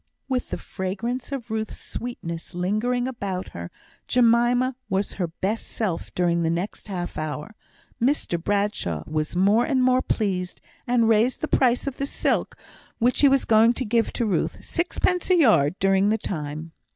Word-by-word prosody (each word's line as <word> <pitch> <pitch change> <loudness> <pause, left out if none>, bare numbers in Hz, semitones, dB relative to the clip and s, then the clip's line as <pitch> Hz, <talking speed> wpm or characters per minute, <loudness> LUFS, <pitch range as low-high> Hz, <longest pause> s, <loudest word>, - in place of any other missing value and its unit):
With 255 -2 -1
the - - -3
fragrance 225 +8 -4
of 245 -5 -5
Ruth's 220 -1 -3
sweetness 170 -10 -6
lingering 215 +8 0
about 200 -7 -4
her, 85 0 -7 0.4
Jemima 245 +1 +3
was 195 +1 0
her 175 - +1
best 195 +7 -3
self 195 -7 -3
during 170 -1 +2
the 165 - +1
next 175 +7 -3
half 180 -3 -4
hour. 155 +5 -4 0.5
Mr 235 - 0
Bradshaw 200 - -1
was 155 +1 -2
more 200 +6 +4
and 265 -3 +1
more 255 0 +4
pleased, 185 -7 -2 0.3
and 240 -2 +3
raised 225 +3 +3
the 310 - -1
price 250 -4 +2
of 275 -1 -4
the 275 - -2
silk, - - 0 0.4
which 245 +2 +2
he 285 - +7
was 270 -1 +2
going 225 +1 +5
to 255 - -3
give 230 +1 +2
Ruth, 220 -5 -1
sixpence 355 +1 0
a 370 - +6
yard 210 - +4
during 195 +1 +3
the 220 - +2
time. 155 -4 -5
220 Hz, 165 wpm, -24 LUFS, 180-245 Hz, 0.5 s, he